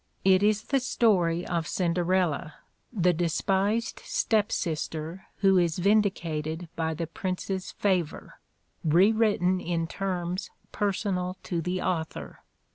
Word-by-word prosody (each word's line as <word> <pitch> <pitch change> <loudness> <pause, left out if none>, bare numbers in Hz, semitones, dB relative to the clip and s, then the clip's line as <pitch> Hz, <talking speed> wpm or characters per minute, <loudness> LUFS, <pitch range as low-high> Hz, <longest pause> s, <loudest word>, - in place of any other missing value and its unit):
It 190 0 +6
is 210 +1 +2
the 275 - +1
story 180 -9 +2
of 170 -2 -2
Cin 175 -3 0
derella, 175 -3 0 0.4
the 180 -6 +2
despised 195 +6 0
step 225 - +1
sister 160 +2 -3
who 195 -2 +5
is 170 -2 +1
vindicated 175 -5 0
by 160 -1 -1
the 165 +2 -2
prince's 185 +2 -4
favor, 185 -6 -1 0.4
rewritten 185 +2 +3
in 170 -2 -1
terms 180 0 -3 0.2
personal 190 -3 -1
to 170 -2 -2
the 180 +2 -2
au 180 -3 +1
thor. 75 - -10
180 Hz, 120 wpm, -27 LUFS, 165-200 Hz, 0.4 s, It